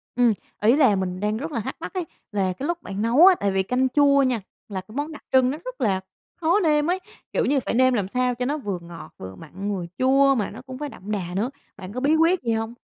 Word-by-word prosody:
Ừm. 240 -2 +4 0.3
Ý 225 +5 +5
là 265 -9 +5
mình 185 -1 -2
đang 210 +2 0
rất 310 +7 -5
là 235 - -2
thắc 210 - -4
mắc - - -6
ấy, 365 -3 -2 0.3
là 195 -3 0
cái 270 +10 -5
lúc 345 0 -3
bạn 195 +1 -4
nấu 240 +10 +6
á, 380 -1 +8
tại 200 - +1
vì 190 0 +1
canh 250 +6 +1
chua 280 0 +4
nha, 250 -4 0 0.3
là 190 -2 -4
cái 215 +5 -15
món 290 +3 -2
đặc 300 - -10
trưng 260 -1 +5
nó 290 - -4
rất - - -7
là 190 -4 +1 0.3
khó 345 +4 +2
nêm 300 -5 +2
ấy. 370 - 0 0.3
Kiểu - - +1
như 280 +1 +2
phải - - -1
nêm 255 +2 +4
làm 205 -6 0
sao 250 +3 0
cho 250 +1 -2
nó 290 +4 -1
vừa 205 -10 -4
ngọt, 170 -1 -10
vừa 95 0 -8
mặn, 195 - -5
vừa 180 -2 -4
chua 275 +1 +4
mà 215 -5 -1
nó 225 +5 -10
cũng 260 0 -9
phải 295 +1 -4
đậm 205 -5 -9
đà 180 -4 -3
nữa. 215 +6 0 0.3
Bạn 190 0 -9
có 250 - -3
bí 285 +4 +3
quyết 335 +3 +3
gì 230 -2 +1
hông? 225 +1 -2
250 Hz, 275 wpm, -24 LUFS, 200-285 Hz, 0.3 s, á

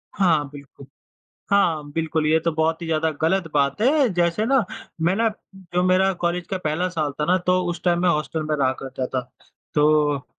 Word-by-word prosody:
हाँ, 160 -7 +2
बिल्कुल 140 -1 -13 0.6
हाँ, 165 -7 +2
बिल्कुल। 160 0 -1
ये 160 +1 +4
तो 170 +1 -1
बहुत 160 +1 0
ही - - -4
ज़्यादा 160 0 +1
गलत 180 +2 +1
बात 140 +4 +1
है, 275 +3 +4
जैसे 175 +4 +1
ना, 265 0 +3 0.4
मैं 175 +3 +2
ना, 225 +2 +2 0.3
जो 180 -1 -2
मेरा 185 +1 +3
कॉलेज 175 0 -1
का 190 - -2
पहला 155 +4 0
साल 155 -5 -2
था 150 - +1
ना, 180 +3 +3
तो 180 0 +1
उस 175 0 -5
टाइम 175 -1 +2
मैं 180 - +3
हॉस्टल 155 -1 -1
में 155 - +2
रहा 135 -3 +2
करता 130 -1 -4
था, 130 0 -2 0.5
तो 150 -2 +2
165 Hz, 195 wpm, -22 LUFS, 150-180 Hz, 0.6 s, ये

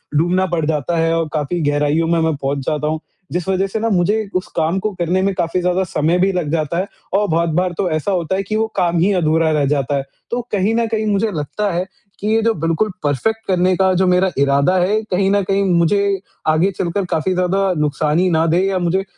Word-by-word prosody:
डूबना 175 +4 +2
पड़ 160 -3 0
जाता 155 +2 -1
है 165 0 +2
और 165 -1 -1
काफ़ी 155 +3 -1
गहराइयों 150 +3 +1
में 170 0 +2
मैं 160 -1 +1
पहुँच 140 0 -2
जाता 150 -1 -1
हूँ। 155 0 -1 0.3
जिस 175 0 -3
वजह 190 0 +1
से 205 +3 -3
ना 230 +1 0
मुझे 205 +3 +1
उस 185 - -1
काम 165 +4 +1
को 215 +2 -2
करने 175 +2 +1
में 195 0 +1
काफ़ी 175 0 -1
ज़्यादा 180 +1 +1
समय 165 0 0
भी 195 +2 +3
लग 170 -5 -2
जाता 160 0 -1
है 190 +2 -1 0.3
और 205 +1 +2
बहुत 165 +1 +1
बार 180 -1 -1
तो 185 - 0
ऐसा 155 +5 -1
होता 180 -1 -1
है 195 - -1
कि 215 +3 -3
वो 220 +1 +2
काम 175 -2 +1
ही 195 +4 +3
अधूरा 160 -2 +2
रह 150 -2 +1
जाता 140 -1 0
है। 135 - -2 0.3
तो 245 - -1
कहीं 205 +2 +1
न 230 0 +1
कहीं 220 -1 -1
मुझे 210 +1 +1
लगता 180 +6 -2
है, 175 +2 -1 0.3
कि 210 - -3
ये 225 +1 +2
जो 230 - +3
बिल्कुल 165 +5 0
परफेक्ट 220 +11 -1
करने 185 0 +2
का 190 -1 +3
जो 190 - +3
मेरा 180 +1 +3
इरादा 140 +5 +3
है, 200 +5 +2
कहीं 195 +1 +2
न 205 - +3
कहीं 195 +1 +1
मुझे 195 +4 +2 0.3
आगे 155 +5 +3
चलकर 185 +2 -1
काफ़ी 165 +4 0
ज़्यादा 185 +2 +1
नुकसान 150 +2 0
ही 185 0 +2
ना 160 -1 +2
दे 170 +2 +2
या 195 -1 0
मुझे 180 +2 0
180 Hz, 240 wpm, -18 LUFS, 160-195 Hz, 0.3 s, भी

